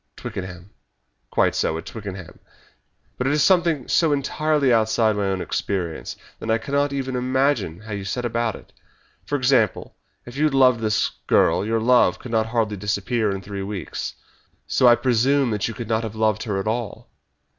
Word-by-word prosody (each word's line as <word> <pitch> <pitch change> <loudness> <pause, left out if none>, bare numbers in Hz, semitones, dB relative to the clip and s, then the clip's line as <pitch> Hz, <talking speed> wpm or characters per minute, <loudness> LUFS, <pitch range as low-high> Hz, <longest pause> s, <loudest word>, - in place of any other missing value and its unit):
"Twickenham." 90 0 -7 0.6
"Quite - - +2
so 80 - 0
at 80 - -7
Twickenham. 95 -5 -8 0.8
But 125 - 0
it 140 - +2
is 150 -1 +3
something 170 -7 +2
so 165 -3 +3
entirely 145 -1 +1
outside 110 -1 +2
my 100 -1 -1
own 95 -1 -1
experience 90 -5 -3 0.2
that 110 - -6
I 110 - +3
cannot 140 +4 -1
even 135 -2 -3
imagine 125 - 0
how 110 0 -10
you 100 -1 -4
set 120 +6 -3
about 115 -2 -1
it. - - -15 0.5
For 145 - -1
example, 125 -6 +1 0.3
if 120 - -10
you 150 +2 +2
had 150 -3 +1
loved 130 -3 +5
this 110 -1 0 0.2
girl - - +3
your 115 +2 0
love 125 +2 +4
could 120 - -9
hardly 110 -1 0
disappear 105 +3 -1
in 95 -1 -4
three 100 0 -6
weeks, 100 -1 -5 0.5
so 125 - +3
I 120 - +8
presume 125 +2 +2
that 105 -2 -1
you 115 - -6
could 120 - -6
not 110 0 +1
have 110 -2 -6
loved 110 -1 +1
her 100 -3 -1
at 95 - -4
all. 115 0 -4
115 Hz, 180 wpm, -22 LUFS, 105-130 Hz, 0.8 s, I